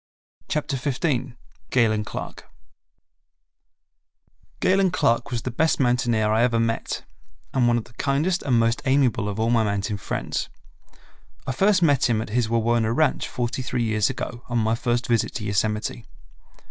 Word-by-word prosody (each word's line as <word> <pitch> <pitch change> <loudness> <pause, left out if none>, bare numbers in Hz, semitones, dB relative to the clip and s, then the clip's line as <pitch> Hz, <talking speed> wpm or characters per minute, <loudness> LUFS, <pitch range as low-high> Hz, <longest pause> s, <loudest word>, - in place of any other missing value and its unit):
Chapter 150 -2 -1
15 130 -2 -2 0.3
Galen 110 -4 +2
Clark - - -7 2.1
Galen 190 0 +3
Clark 140 -8 +1
was 120 -2 -3
the 130 - -3
best 160 +7 +1
mountaineer 120 -4 +2
I 110 +1 +3
ever 120 -1 +2
met, 115 0 -2 0.5
and 125 -3 +3
one 120 0 +3
of 115 - -2
the 115 - -19
kindest 150 +9 0
and 125 -4 +1
most 115 +4 +1
amiable 130 -6 +2
of 100 +1 -5
all 115 +1 +1
my 115 -2 +3
mountain 100 0 -1
friends. - - -3 1.0
I - - -1
first 190 +6 +3
met 145 -6 +3
him 115 -2 +2
at 110 - -4
his 115 0 0
Wawona 115 0 +1
ranch 145 +3 +1
forty 125 +1 -3
three 125 -1 -2
years 110 -2 +1
ago 125 -2 -5
on 120 - 0
my 110 -1 +2
first 120 +1 0
visit 115 -3 0
to 115 - -4
Yosemite. 105 +2 -1
120 Hz, 160 wpm, -24 LUFS, 115-135 Hz, 2.1 s, Galen